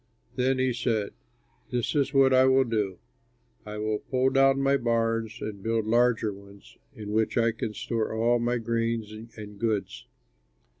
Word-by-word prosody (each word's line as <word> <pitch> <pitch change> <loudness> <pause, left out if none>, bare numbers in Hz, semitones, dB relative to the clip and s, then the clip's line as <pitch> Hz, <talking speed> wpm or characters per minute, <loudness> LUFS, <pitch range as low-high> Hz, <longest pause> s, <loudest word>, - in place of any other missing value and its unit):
Then 130 +1 +1
he 130 -1 +1
said, 110 -4 -1 0.6
'This 120 -1 -1
is 140 -2 +1
what 135 -2 +4
I 130 0 +6
will 130 0 +4
do: 105 -6 -2 0.7
I 105 0 -6
will 105 0 -1
pull 130 0 0
down 135 0 +4
my 135 0 +3
barns 115 -2 -1
and 105 -2 -6
build 115 +1 -1
larger 115 -1 +2
ones 100 0 -16 0.2
in 105 -3 -7
which 110 +2 0
I 115 0 +3
can 110 -1 -5
store 115 -2 -2
all 115 +2 +2
my 120 +1 0
grain 115 -1 -3
and 105 -1 -10
goods. 110 -3 -2
115 Hz, 160 wpm, -27 LUFS, 110-125 Hz, 0.7 s, I